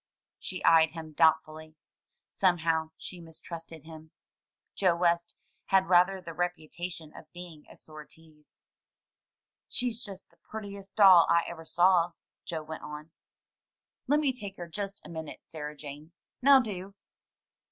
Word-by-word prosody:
She 185 - -6
eyed 160 -1 +6
him 160 -2 -8
doubtfully. 155 0 +1 0.5
Somehow 165 -4 +1
she 180 -2 -8
mistrusted 165 -1 -10
him. 160 0 -12 0.6
Joe 185 -3 +2
West 170 0 +1 0.3
had 190 -1 +3
rather 180 +2 +5
the 170 -2 -8
reputation 175 -1 -4
of 155 - -13
being 175 -4 -10
a - - -14
sore 155 -1 -10
tease. 155 -2 -19 1.1
"She's 245 -2 0
just 195 -2 -7
the - - -29
prettiest 200 -2 -9
doll 190 -5 +8
I 170 0 +4
ever 165 -1 -8
saw," 175 0 +3 0.3
Joe 160 -2 -4
went 160 0 -7
on. 150 +1 -9 1.0
"Lemme 290 -1 +2
take 200 -6 -8
her 175 - -6
just 200 +3 -6
a - - -9
minute, 160 -2 -8
Sarah 150 -1 -7
Jane; 150 +3 -10 0.3
now 275 +1 +8
do." 200 -4 -5
170 Hz, 135 wpm, -29 LUFS, 160-190 Hz, 1.1 s, doll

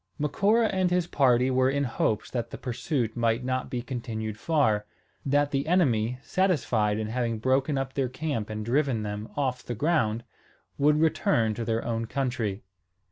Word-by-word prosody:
Macora 200 +10 +2
and 185 -1 +2
his 180 -1 +1
party 130 -5 +3
were 130 0 +3
in 140 +1 0
hopes 110 -4 -1
that 120 -2 -2
the - - -7
pursuit 125 -2 -2
might 115 0 +1
not 130 0 -2
be 125 -2 -3
continued 115 -4 -4
far, 110 -7 +1 0.4
that 145 +1 +2
the 140 +2 -1
enemy, 125 -10 +2
satisfied 125 - +1
in 110 -1 -3
having 115 -1 -1
broken 130 +5 +1
up 135 0 -3
their 135 -3 0
camp 130 -5 -3
and 110 0 -4
driven 130 -2 +1
them 105 +1 -5
off 130 -3 0
the 120 - -5
ground, 120 -5 +1 0.6
would 150 +2 +4
return 120 -8 +2
to 115 - -4
their 115 0 -1
own 115 -1 -2
country. 120 -6 -2
125 Hz, 170 wpm, -27 LUFS, 115-145 Hz, 0.6 s, would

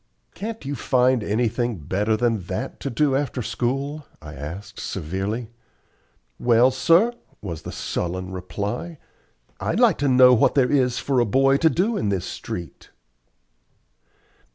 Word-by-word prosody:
"Can't 220 -3 -6
you 140 - -3
find 125 -3 +2
anything 115 +1 0
better 100 +8 0
than 115 -1 +1
that - - -4
to 140 - -4
do 140 +2 +1
after 135 -3 -2
school?" 135 +6 -3
I 75 0 -10
asked, 75 +9 -8
severely. 100 +8 -4 0.9
"Well, 120 +2 +4
sir," 170 - +3 0.3
was 85 -6 -6
the - - -7
sullen 90 +1 -3
reply, 100 - -5 0.6
"I'd - - -1
like - - +4
to 145 - +1
know 125 -1 +7
what 115 - +3
there 130 -3 +3
is 125 -4 +2
for 130 +2 0
a 120 - +3
boy 135 +5 +3
to 160 - +4
do 205 +7 0
in 105 - -1
this 95 -3 -1
street." 85 -1 -7
120 Hz, 145 wpm, -23 LUFS, 100-135 Hz, 0.9 s, know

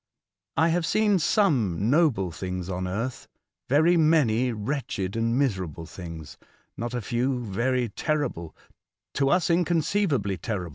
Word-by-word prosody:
I 160 +1 +4
have 165 0 0
seen 210 -3 +3
some 120 - +2
noble 135 - +2
things 90 +1 -5
on 90 0 -3
earth, 115 +7 -4 0.4
very 160 +6 +4
many 130 -7 +3
wretched 110 -4 -3
and 115 +1 0
miserable 95 - -1
things; 80 -4 -9 0.4
not 120 +1 -4
a 120 - -2
few, 125 +4 -1
very 120 +5 0
terrible 125 - -2 0.3
— - - -65
to 135 -1 +1
us 175 0 +2
inconceivably 165 - +1
terrible. 90 -1 -4
120 Hz, 135 wpm, -26 LUFS, 95-155 Hz, 0.4 s, I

